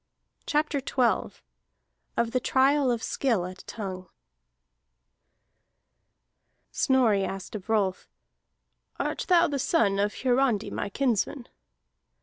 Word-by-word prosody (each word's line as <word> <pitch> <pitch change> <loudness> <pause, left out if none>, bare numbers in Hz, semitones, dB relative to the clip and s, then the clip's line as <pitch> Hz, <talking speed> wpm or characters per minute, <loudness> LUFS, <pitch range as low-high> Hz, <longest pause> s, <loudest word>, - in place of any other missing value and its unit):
CHAPTER 300 -1 +1
XII 255 -2 0 0.8
OF 235 -1 +1
THE 255 - +1
TRIAL 270 +2 +3
OF 235 -2 -1
SKILL 230 -10 0
AT 185 0 -9
TONGUE 185 -4 -6 2.6
Snorri 235 -7 +3
asked 195 -1 -5
of 215 -1 -7
Rolf: 200 -4 0 0.9
"Art - - -2
thou 345 -2 +5
the 280 -1 -2
son 205 - +2
of 205 0 0
Hiarandi 250 -4 +2
my 205 - -3
kinsman?" 245 +2 -1
235 Hz, 105 wpm, -27 LUFS, 200-270 Hz, 2.6 s, thou